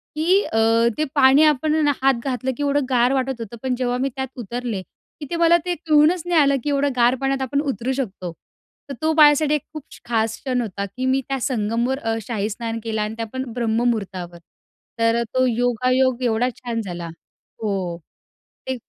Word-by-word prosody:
की 350 +6 +3
अ, 225 - -3 0.4
ते 310 - +1
पाणी 270 +1 +6
आपणना 305 0 +3
हात 270 0 +4
घातलं 260 0 -1
की 290 - -2
एवढं 285 -1 +1
गार 250 0 +3
वाटत 265 -2 -1
होतं. 230 +1 -7
पण 260 -1 0
जेव्हा 245 0 -1
मी 270 +2 0
त्यात 265 0 -3
उतरले 235 -3 -4 0.4
की 295 - -6
ते 340 - -2
मला 335 0 +5
ते 355 -1 -1
कळूनच 315 +2 +3
नाही 350 -2 +3
आलं 280 -1 +3
की 295 - -1
एवढं 285 0 +1
गार 245 +1 +4
पाण्यात 270 0 0
आपण 280 +2 0
उतरू 265 -3 -2
शकतो. 195 -9 -4 0.6
तर - - -4
तो 315 0 +2
माझ्यासाठी 300 0 +5
खूप 305 +2 -10
क्ष - - -13
खास 225 -1 0
क्षण 255 -2 -1
होता 200 -2 -4
की 250 +7 -5
मी 265 +1 +2
त्या 270 0 -1
संगमवर 235 +2 -1
अ, 225 -3 -1
शाही 215 -1 -3
स्नान 230 +1 -4
केलं 220 -1 -2
आणि 210 +1 -3
त्या 230 - -3
पण 260 - -2
ब्रह्ममुहूर्तावर. 220 -7 -1 0.6
तर 230 0 +3
अ, - - +1
तो 255 0 +3
योगायोग 250 +1 +1
एवढा 240 +1 +1
छान 235 -2 -4
झाला. 175 -4 -6 0.6
हो. 190 -5 -2 0.7
ते 260 - -1
255 Hz, 190 wpm, -22 LUFS, 230-280 Hz, 0.7 s, पाणी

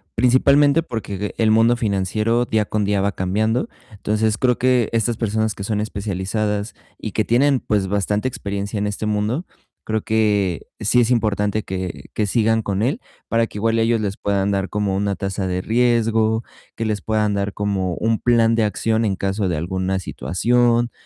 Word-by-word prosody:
principalmente 140 +5 +4
porque 105 - -5
el 110 -1 +3
mundo 115 +2 +4
financiero 110 +2 0
día 110 -2 +1
con 105 0 -1
día 100 -1 +1
va 100 +1 +1
cambiando, 110 +7 0 0.2
entonces, 105 +1 0
creo 125 +2 +2
que 125 -3 +2
estas 115 0 +1
personas 110 -1 -1
que 100 - -6
son 105 0 -1
especializadas 105 +1 -2 0.2
y 110 - -6
que 110 - 0
tienen, 135 +3 +3
pues 105 -4 0
bastante 105 +4 0
experiencia 100 -2 -4
en 105 - 0
este 105 +1 -3
mundo, 105 - -1 0.4
creo 110 0 -1
que 105 -6 0
sí 125 +4 +3
es 120 +1 +1
importante 105 -2 +1
que 95 -1 -6
que 105 - 0
sigan 110 +1 +2
con 100 -2 -2
él, 140 - 0 0.3
para 115 0 +2
que - - -10
igual 115 +2 +1
ellos 115 0 +2
les 100 -2 -2
puedan 100 -1 0
dar 95 -1 -1
como 105 -2 -1
una 100 0 0
tasa 95 -1 -3
de 90 0 -1
riesgo, 115 -1 +2 0.3
que 115 - -2
les 105 -2 -1
puedan 105 -1 0
dar 100 0 -1
como 100 -3 -1
un 115 +3 0
plan 115 -2 +3
de 115 - +2
acción 110 +2 0
en 100 -4 0
caso 95 0 -1
de 85 - -1
alguna 95 +3 -2
situación, 120 +6 +1
110 Hz, 180 wpm, -21 LUFS, 100-115 Hz, 0.4 s, principalmente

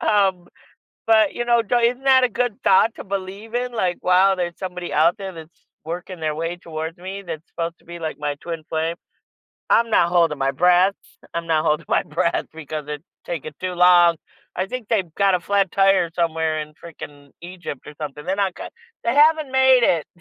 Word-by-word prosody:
um, 190 -4 +2 0.6
but, 220 -2 +4
you 240 - -2
know, 235 -1 +4
isn't 240 +3 +1
that 260 -1 +5
a 250 - +3
good 245 -1 -1
thought 215 +4 +4
to - - -8
believe 200 +3 -6
in, 245 0 -1
like, 185 -6 -1
wow, 185 +2 +4
there's 175 -1 -3
somebody 180 -2 -6
out 165 +5 +3
there 190 -1 -5
that's 165 0 -14 0.2
working 175 +2 -6
their 155 -1 -1
way 165 +2 -3
towards 165 0 -6
me 190 +3 -7
that's 165 -3 -8
supposed 165 0 -5
to - - -28
be, 170 0 -9
like, 160 -1 -4
my 145 -1 -1
twin 165 -2 -6
flame. 160 +1 -1 0.8
I'm 230 0 +4
not 170 - +4
holding 170 -3 +2
my 135 0 +1
breath. 180 +6 +4 0.4
I'm 170 0 -3
not 160 -2 +1
holding 150 +2 0
my - - +2
breath 170 +2 -1
because 155 -1 -6
it's 150 +1 -6 0.2
taking 155 -3 -5
too 185 -1 -3
long. 175 -1 +6 0.4
I 185 - -1
think 250 0 -6
they've 190 -8 -1
got 195 -2 +3
a - - -6
flat 195 +1 +1
tire 195 -3 +3
somewhere 160 -2 0
in 150 0 -7
freaking 145 -3 -11
Egypt 175 -6 -8
or 150 - -9
something. 150 0 -6
They're 190 - -1
not 195 -3 0
gon - - -8 0.3
they 235 - +1
haven't 300 -1 +4
made 260 -1 +5
it, 165 -3 +2
180 Hz, 200 wpm, -22 LUFS, 165-200 Hz, 0.8 s, long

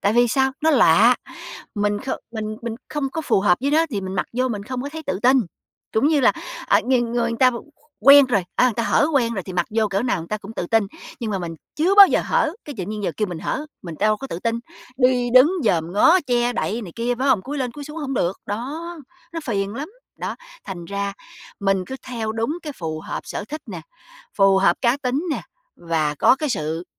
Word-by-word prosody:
Tại 205 - +2
vì 240 +1 +4
sao? 265 +2 +2
Nó 320 - +4
lạ, 235 - +6 0.6
mình 205 0 0
không 265 - -3
mình 220 -1 -4 0.2
mình 235 -2 -3
không 285 -3 -2
có 320 - -3
phù 240 - +1
hợp 180 -3 +3
với 280 +2 0
nó, 325 +2 +3
thì 205 -4 -2
mình 190 0 -5
mặc - - -1
vô 255 +2 0
mình 210 -4 -4
không 250 +3 -5
có 280 - -4
thấy 320 +1 -7
tự - - -1
tin. 260 +2 +5 0.5
Trũng 220 +6 +2
như 305 -3 +3
là, - - +5 0.3
ờ, - - +4
người 255 -1 +3
người 235 0 -1
người 230 - -4
ta 255 -1 +6
qu 235 - -7 0.4
quen 280 0 +8
rồi, 205 -8 +1
a, - - +4
người 255 - +3
ta 235 - 0
hở 285 - +3
quen 235 -4 +2
rồi 190 - -3
thì 185 - -8
mặc 175 -1 0
vô 220 0 +1
cỡ 195 +2 -1
nào 245 -7 0
người 165 - -9
ta 215 - -2
cũng 210 +2 -10
tự 175 - -2
tin, 225 -1 +2 0.3
nhưng 225 -2 -3
mà 195 - -1
mình 170 -2 -5 0.2
chưa 345 +6 +2
bao 400 -1 +11
giờ - - +1
hở, 320 - +1
cái, 290 - -7
tự 185 - -2
nhiên 210 +1 -5
giờ 175 - -1
kêu 210 -2 -1
mình 175 -2 -5
hở, 300 - -3 0.2
mình 170 -3 -7
đâu 215 +1 +2
có 270 - -7
tự 170 - -5
tin, 230 +2 -1 0.4
đi 250 -1 +2
đứng 275 +8 +7
dòm 170 -5 +1
ngó 320 - +5
che 245 0 +1
đậy 230 0 -2
này 180 -5 -9
kia, 235 +1 0
phải 270 +2 +1
hông? 240 -8 +3
Cúi 285 +5 -5
lên 250 -3 -2
cúi 290 +2 -8
xuống 300 +2 -9
hổng 275 -3 -3
được, 180 -4 -1
đó, 250 +10 -4 0.5
nó 330 - -4
phiền 200 -4 -2
lắm. 285 +7 -5 0.3
Đó, - - -4 0.3
thành 180 -5 -7
ra 200 +2 -3 0.5
mình 195 -2 +1
cứ 265 - -6
theo 225 -3 -3
đúng 230 +10 -2
cái 300 - -5
phù 160 - -5
hợp - - -5
sở - - -5
thích 305 +1 -6
nè, - - -7 0.6
phù 195 -1 +5
hợp 180 -3 +3
cá 240 +1 +3
tính 275 +3 -2
nè, - - -2 0.3
và 160 -3 -1
có 200 - +4
cái 300 +1 -2
sự 160 -3 -2
235 Hz, 250 wpm, -22 LUFS, 195-265 Hz, 0.6 s, bao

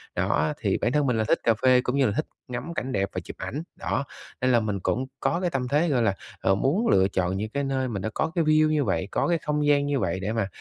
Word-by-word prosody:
Đó, 75 0 +1
thì - - +1
bản 120 - 0
thân 150 +1 +2
mình 125 -3 +1
là 110 - +2
thích 110 - +2
cà 115 - +4
phê 130 -1 +6
cũng 125 +1 -2
như 140 -1 +3
là 105 - +2
thích 155 - 0 0.2
ngắm 125 +7 -5
cảnh 130 -5 -3
đẹp 100 -4 0
và - - -3
chụp - - -9
ảnh, 150 +4 -4
đó, 140 - -2 0.4
nên 130 0 +3
là 120 - +5
mình 105 -3 -2
cũng 125 +7 -1
có 170 - 0
cái 180 - +1
tâm 130 -4 -2
thế, 150 +6 +2
gọi 130 -5 +2
là, 100 -3 +2 0.2
à, 95 - +2
muốn 145 - +1
lựa 95 0 +4
chọn 95 -1 -1
những 110 +2 -3
cái 140 +4 -2
nơi 135 -1 -1
mình 105 -5 -4
đã 110 - -2
có 160 - -1
cái 170 - +2
view 155 0 +4
như 155 -2 +2
vậy, 95 -5 -1
có - - +1
cái 170 -1 +2
không 150 -1 -1
gian 145 -1 +4
như 145 -2 0
vậy 95 -2 -1
để 100 +3 -2
mà, 115 -4 0
130 Hz, 295 wpm, -26 LUFS, 105-150 Hz, 0.4 s, phê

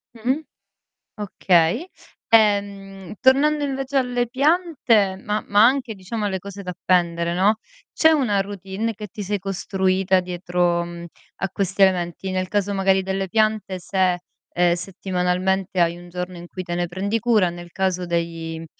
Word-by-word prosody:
Mh-mh 255 +6 -1 0.8
okay. 185 - +2 0.5
Ehm, 200 -3 +1
tornando 290 +3 +4
invece 270 0 -3
alle 245 -2 0
piante, 260 - +2
ma 210 0 -2
ma 205 +2 +5
anche 250 -3 0
diciamo 205 +3 -5
alle 190 -2 -1
cose 200 +1 -9
da 180 - -5
appendere 170 -1 0
no, 200 +4 +3 0.3
c'è 320 - +5
una 250 -10 +2
routine 195 +3 -4
che 210 +1 -7
ti 205 +3 -7
sei 205 +1 -2
costruita 190 0 +1
dietro 175 -1 0
mh 170 0 -8 0.3
a 195 - -2
questi 195 +1 -1
elementi? 185 0 +1
Nel 185 0 -1
caso 205 0 0
magari 195 0 +2
delle 190 0 -2
piante 215 -2 0
se, 185 +1 +1 0.3
ehm, 175 0 +3
settimanalmente 185 +1 -1
hai 170 0 +2
un 175 0 -12
giorno 180 +1 -5
in 175 - -9
cui 185 - -6
te 175 - -4
ne 175 0 -1
prendi 200 +5 -1
cura, 215 -5 +3
nel 175 0 -10
caso 185 -1 -1
dei, 165 -1 -3
190 Hz, 155 wpm, -22 LUFS, 180-215 Hz, 0.8 s, ma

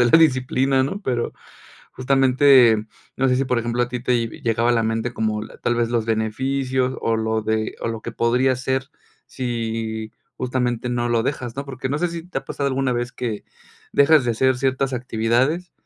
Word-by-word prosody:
de 120 - +6
la 165 - +6
disciplina, 130 -2 +3
¿no? 195 +9 -4
Pero, 120 -2 -1 0.6
justamente, 130 -4 +4 0.3
no 135 0 +2
sé 125 - +3
si, 135 - +1
por 125 -2 +1
ejemplo, 120 +1 0
a 120 - -1
ti 125 0 -4
te, 120 -1 +1
vi - - -12
llegaba 115 +1 +1
a - - +4
la 115 -1 +2
mente 115 +2 -2
como 110 0 -1 0.2
tal 120 - +1
vez, 120 -1 +1
los 115 -2 0
beneficios 130 +4 -1
o 115 - +1
lo 110 0 0
de 110 0 -1
o - - -2
lo 115 -1 -5
que 115 - -6
podría 125 +3 +2
ser 130 +2 -2 0.4
si 115 -3 -3 0.3
justamente 125 -1 -1
no 120 0 -1
lo 115 -1 +2
dejas, 125 -2 -3
¿no? 140 - -3
Porque, 130 -1 -5
no 145 - -1
sé, 175 - 0
si 165 0 -6
te - - -8
ha - - -13
pasado 140 - -3
alguna 130 -1 0
vez 120 0 -2
que 115 -4 -4 0.5
dejas 145 -1 +5
de 120 - +2
hacer 130 +2 +2
ciertas 135 0 0
actividades 125 +8 0
125 Hz, 200 wpm, -22 LUFS, 115-130 Hz, 0.6 s, de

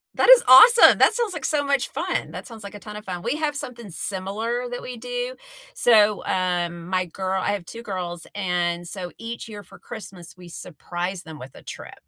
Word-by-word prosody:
That - - +3
is - - +9
awesome. 460 - +9
That - - +5
sounds 460 -6 -1
like 310 -5 -5
so 295 -2 +1
much 280 -2 0
fun. - - -3
That - - -8
sounds 225 -3 -11
like 200 - -9
a 205 - -9
ton 210 0 -10
of 210 - -9
fun. 180 -2 -5
We 290 - -1
have 305 -2 -2
something 235 -7 -7
similar 210 +8 -3
that 245 - -6
we 250 -1 -7
do. - - -4 0.4
So, 215 -3 +4
um, 175 -2 -1
my 185 -1 0
girl 190 +2 -3
I 205 - -1
have 200 -4 -3
2 230 +5 -9
girls. 180 -4 -5
And 175 -3 -2
so, 180 -1 -6
each 230 0 -6
year 210 -2 -9
for 180 - -16
Christmas, 175 -5 -10
we 180 -1 -14
surprise 175 +3 -6
them 160 -1 -10
with 130 0 -10
a - - -14
trip. - - -9
200 Hz, 215 wpm, -23 LUFS, 180-245 Hz, 0.4 s, is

